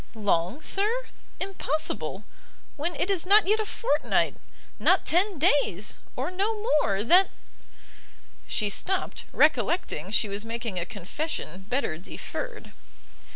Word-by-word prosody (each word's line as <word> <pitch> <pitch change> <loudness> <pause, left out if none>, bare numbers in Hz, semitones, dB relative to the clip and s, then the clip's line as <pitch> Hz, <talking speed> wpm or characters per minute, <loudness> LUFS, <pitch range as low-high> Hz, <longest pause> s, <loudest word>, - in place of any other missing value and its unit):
"Long, 205 - 0
sir? 445 +5 0 0.3
impossible! 320 -5 -2 0.5
when 325 +3 -2
it 370 - 0
is 370 -4 +1
not 405 +3 +6
yet 430 +2 +3
a 435 - -1
fortnight 300 -10 +1 0.4
not - - +3
ten 375 +2 +2
days, 285 - +2 0.2
or - - -2
no 410 +4 -1
more, 290 - +2
that 360 - +6 0.6
" - - -26
She 210 - +2
stopt, 370 - 0
recollecting 190 - +2
she 220 +1 +2
was 200 +1 -3
making 230 -4 -4
a 170 - -4
confession 200 - -5
better 245 - -1
deferred. 455 - -7
300 Hz, 125 wpm, -27 LUFS, -, 0.6 s, not